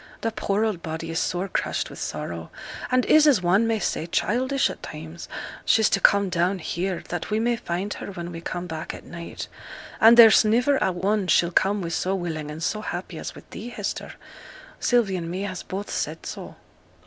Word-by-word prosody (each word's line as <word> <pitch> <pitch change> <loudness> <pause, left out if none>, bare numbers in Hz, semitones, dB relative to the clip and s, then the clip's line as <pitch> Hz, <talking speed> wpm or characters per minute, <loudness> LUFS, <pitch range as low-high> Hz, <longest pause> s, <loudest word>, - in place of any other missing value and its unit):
Th' 225 -1 -1
poor 205 +2 +1
old 205 -6 -2
body 165 0 -5
is 165 - 0
sore 180 +2 -1
crushed - - -2
with - - -9
sorrow; - - -5 0.4
and 255 -1 +3
is, 310 0 +6
as 245 -11 +4
one 195 +6 +3
may 225 -1 +1
say, 170 -4 -2
childish 260 +10 +1
at - - -7
times; 160 +2 -8 0.3
she's 220 -1 +4
to 195 - +3
come 200 +1 +5
down 180 +2 +1
here, 180 +2 -3
that 175 -1 -4
we 215 0 +1
may 240 +1 +2
find 200 -2 -3
her - - -7
when 175 -3 -6
we 165 -1 -7
come 175 +1 -4
back 160 -2 -5
at - - -11
night; 170 -1 -7 0.5
and 230 +2 +8
there's 225 -3 +9
niver 245 +6 +3
a 190 - +2
one 190 +2 0
she'll 170 -1 +3
come 195 +3 +2
with 170 -1 -3
so 190 +1 0
willing 160 -5 -4
and 155 +2 -6
so 210 +5 -1
happy 175 -4 -5
as - - -6
with - - -13
thee, 230 - -7
Hester. - - -4 0.7
Sylvie 230 -6 +2
and 165 -1 -4
me 185 +3 -3
has 185 -3 -4
both 195 +2 -5
said - - -3
so.' - - -7
190 Hz, 205 wpm, -25 LUFS, 170-220 Hz, 0.7 s, there's